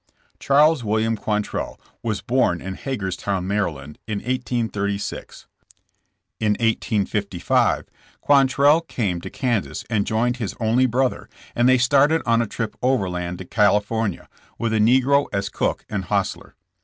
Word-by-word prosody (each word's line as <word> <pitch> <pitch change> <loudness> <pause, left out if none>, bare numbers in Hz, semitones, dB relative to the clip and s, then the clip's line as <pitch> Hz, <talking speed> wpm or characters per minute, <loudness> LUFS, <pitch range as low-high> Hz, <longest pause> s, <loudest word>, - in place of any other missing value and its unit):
Charles 145 0 +4
William 110 +1 +1
Quantrell 105 -1 -3 0.2
was 110 -3 -2
born 120 -9 +1
in 95 +2 -6
Hagers 100 -5 -4
town, 95 -2 -2
Md., 80 -8 -2
in 105 -2 -2
1836. 110 -4 -3 0.9
In 105 -1 +2
1855 105 -4 0 0.3
Quantrell 140 +2 +4
came 105 - -3
to - - -7
Kan 120 -6 0
sas - - -8
and 105 -3 +1
joined 120 +3 0
his 110 -6 -4
only 120 +3 +3
brother 130 +2 -1 0.3
and 120 +1 +3
they 130 - +6
/started 145 +5 +3
on 115 0 +3
a 115 - -1
trip 105 0 -4
overland 90 -9 -1
to 95 - -8
California, 105 0 +1 0.3
with 115 -1 -1
a 110 - +2
negro 130 +5 +4
as 100 0 -2
cook - - -2
and - - -3
hostler. - - -2
110 Hz, 140 wpm, -22 LUFS, 100-125 Hz, 0.9 s, they